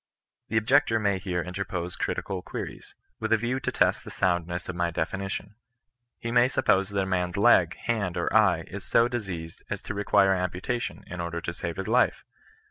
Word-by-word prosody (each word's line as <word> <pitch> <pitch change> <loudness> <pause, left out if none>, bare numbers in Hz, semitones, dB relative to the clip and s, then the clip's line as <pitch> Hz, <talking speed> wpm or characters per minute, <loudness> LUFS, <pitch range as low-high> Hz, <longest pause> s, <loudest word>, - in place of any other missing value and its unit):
The 110 - 0
ob 110 - +1
jector 120 -3 +4
may 100 -3 +1
here 90 -2 -2
interpose 90 -1 -4
critical 95 -2 -2
queries, - - -7 0.2
with - - -3
a 115 - +6
view 120 +4 -1
to - - -2
test - - +2
the - - -9
soundness 85 -1 -1
of 90 - -4
my 85 -1 +1
definition. 95 +5 -3 0.6
He 115 - -4
may 120 +1 +5
suppose 100 -7 +2
that 100 -1 -1
a - - -2
man's 90 -2 -1
leg, - - +5
hand, 105 -7 -2
or 85 - -1
eye, 95 -7 +4
is 100 0 -8
so 115 +7 +4
diseased 95 -9 -5
as - - -2
to - - -4
re 100 0 -2
quire 95 -1 +4
amputation, 90 +6 -2
in 90 0 -6
order 85 0 -3
to 85 - -4
save 85 -1 -5
his 95 - -3
life. - - +2
95 Hz, 200 wpm, -27 LUFS, 90-110 Hz, 0.6 s, a